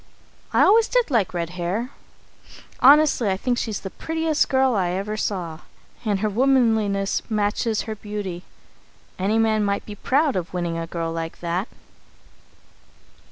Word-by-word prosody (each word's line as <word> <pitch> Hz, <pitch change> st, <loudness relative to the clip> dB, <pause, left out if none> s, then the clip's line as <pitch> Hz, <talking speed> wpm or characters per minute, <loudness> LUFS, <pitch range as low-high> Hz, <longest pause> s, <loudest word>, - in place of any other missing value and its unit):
I -, -, +4 dB
always 445 Hz, +3 st, +5 dB
did -, -, +1 dB
like 220 Hz, -7 st, +2 dB
red 170 Hz, -1 st, -3 dB
hair. 185 Hz, +8 st, -3 dB, 0.9 s
Honestly, 280 Hz, -5 st, +5 dB
I 190 Hz, -, 0 dB
think 245 Hz, +4 st, -1 dB
she's 215 Hz, -3 st, -3 dB
the 190 Hz, -, -6 dB
prettiest 320 Hz, -1 st, -1 dB
girl 265 Hz, -1 st, +3 dB
I 185 Hz, -5 st, +1 dB
ever 200 Hz, +3 st, -3 dB
saw. 175 Hz, -7 st, -3 dB, 0.4 s
And 205 Hz, -4 st, 0 dB
her 215 Hz, -, +1 dB
womanliness 220 Hz, -4 st, +2 dB
matches 215 Hz, +1 st, 0 dB
her 220 Hz, -, -5 dB
beauty. 205 Hz, -4 st, -6 dB, 0.8 s
Any 200 Hz, +4 st, +1 dB
man 220 Hz, -1 st, +2 dB
might 200 Hz, 0 st, -1 dB
be 210 Hz, -, -7 dB
proud 275 Hz, +7 st, +1 dB
of 180 Hz, 0 st, -4 dB
winning 175 Hz, -2 st, -2 dB
a 165 Hz, -, -4 dB
girl 165 Hz, -1 st, -3 dB
like 165 Hz, 0 st, -5 dB
that. 175 Hz, +5 st, -2 dB
210 Hz, 150 wpm, -23 LUFS, 185-245 Hz, 0.9 s, always